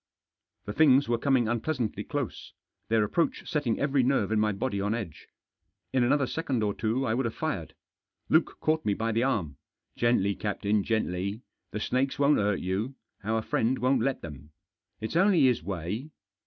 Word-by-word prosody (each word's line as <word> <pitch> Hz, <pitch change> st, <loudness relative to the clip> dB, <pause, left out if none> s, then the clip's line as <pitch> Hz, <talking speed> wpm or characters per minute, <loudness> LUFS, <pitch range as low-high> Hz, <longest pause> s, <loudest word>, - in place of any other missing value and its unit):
The 105 Hz, -, -4 dB
things 140 Hz, 0 st, +5 dB
were 120 Hz, -1 st, +1 dB
coming 130 Hz, -3 st, +2 dB
unpleasantly 120 Hz, 0 st, -1 dB
close -, -, -4 dB, 0.2 s
— -, -, -53 dB
their 110 Hz, -1 st, +3 dB
approach 165 Hz, +11 st, -1 dB
setting 140 Hz, -7 st, 0 dB
every 140 Hz, -1 st, +2 dB
nerve 125 Hz, -5 st, +1 dB
in 110 Hz, -, +2 dB
my 105 Hz, 0 st, +2 dB
body 100 Hz, 0 st, -2 dB
on 105 Hz, +3 st, 0 dB
edge. 95 Hz, -10 st, -7 dB, 0.7 s
In 130 Hz, -2 st, +3 dB
another 140 Hz, +3 st, +3 dB
second 130 Hz, -5 st, -2 dB
or 105 Hz, -1 st, +1 dB
two 115 Hz, +6 st, -1 dB
I 110 Hz, -, +1 dB
would 130 Hz, +2 st, 0 dB
have 115 Hz, -, -3 dB
fired. -, -, -3 dB, 0.5 s
Luke -, -, +2 dB
caught 155 Hz, 0 st, +1 dB
me 105 Hz, -2 st, +1 dB
by 115 Hz, +2 st, -1 dB
the 115 Hz, +1 st, +1 dB
arm. 100 Hz, -, -1 dB, 0.4 s
"Gently, 120 Hz, -4 st, +2 dB
captain, 105 Hz, 0 st, -1 dB
gently. 100 Hz, 0 st, -1 dB, 0.3 s
The 105 Hz, -, -4 dB
snakes 130 Hz, +5 st, 0 dB
won't 145 Hz, +1 st, +4 dB
hurt 105 Hz, -1 st, +1 dB
you; 100 Hz, +9 st, -2 dB, 0.3 s
our 110 Hz, +1 st, 0 dB
friend 120 Hz, +4 st, +1 dB
won't 130 Hz, -1 st, +2 dB
let 135 Hz, +2 st, -1 dB
them. 75 Hz, -2 st, -9 dB, 0.5 s
It's 110 Hz, +7 st, -5 dB
only 185 Hz, -1 st, +4 dB
his 125 Hz, -3 st, +4 dB
way. 100 Hz, -, -4 dB
115 Hz, 180 wpm, -28 LUFS, 105-135 Hz, 0.7 s, things